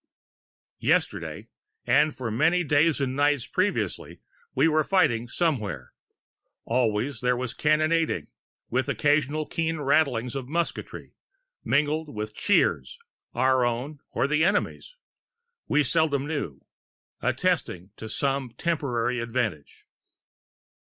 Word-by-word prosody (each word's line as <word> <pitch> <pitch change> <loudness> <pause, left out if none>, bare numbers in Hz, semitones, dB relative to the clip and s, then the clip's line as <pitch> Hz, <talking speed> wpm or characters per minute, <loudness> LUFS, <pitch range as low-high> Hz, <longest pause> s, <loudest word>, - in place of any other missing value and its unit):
Yesterday, - - 0 0.4
and 145 +4 +3
for 125 -3 -4
many 165 +10 +2
days 150 +1 +3
and 130 -2 -1
nights 145 -2 +2
previously, 195 +2 -2 0.4
we - - +4
were 155 -1 +3
fighting 120 -11 +2
somewhere; 115 - -2 0.7
always 120 +1 0
there 125 0 +2
was 125 -1 -3
cannonading, 155 - +1 0.5
with 130 +3 0
occasional 145 +3 +1
keen 165 0 -2
rattlings 135 -5 +1
of 135 -2 -5
musketry, 170 +4 -4 0.5
mingled 150 +1 0
with 105 0 -4
cheers, 65 -9 +1 0.4
our 130 +1 +3
own 125 +5 -2
or - - 0
the 150 +2 +2
enemy's, 205 - -1 0.7
we 150 0 +3
seldom 145 -1 +1
knew, 145 - -4 0.6
attesting 90 +3 -1 0.2
some 135 +2 -1
temporary 125 -7 -1
advantage. 115 - -3
140 Hz, 105 wpm, -26 LUFS, 120-155 Hz, 0.7 s, we